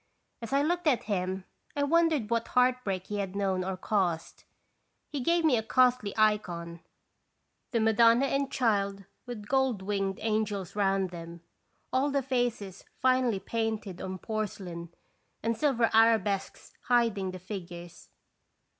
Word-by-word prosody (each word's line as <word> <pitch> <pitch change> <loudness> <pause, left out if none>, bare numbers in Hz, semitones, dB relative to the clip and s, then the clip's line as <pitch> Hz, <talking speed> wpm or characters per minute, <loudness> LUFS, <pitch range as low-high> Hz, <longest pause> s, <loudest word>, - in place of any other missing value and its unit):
As 230 - -7
I 280 +1 +3
looked 345 +2 0
at 265 -6 +3
him 190 -2 -2 0.3
I 285 - +1
wondered 310 -6 +2
what 230 0 0
heartbreak 250 -7 +1
he 205 0 -4
had 195 -1 -3
known 190 -2 0
or 190 0 -3
caused. 180 -5 -1 0.7
He 290 - -3
gave 335 +5 +2
me 275 -6 +4
a - - +1
costly 250 -2 +2
icon, 175 -6 0 0.9
the 235 - 0
Madonna 230 +3 +5
and 275 0 -1
Child 200 -5 0 0.2
with 215 -4 -7
gold 265 -6 +1
winged 195 -1 -1
angels 210 -4 -1
round 195 -2 +1
them, 170 -1 -9 0.5
all 270 +3 +2
the 280 -1 0
faces 240 -7 -2 0.2
finely 255 -5 +2
painted 220 -2 -3
on 190 0 -4
porcelain, 190 -5 -5 0.5
and 230 +1 +1
silver 240 -3 +2
arabesques 220 -3 +2
hiding 230 -6 +2
the 185 - -6
figures. 175 -2 -9
215 Hz, 135 wpm, -29 LUFS, 190-250 Hz, 0.9 s, Madonna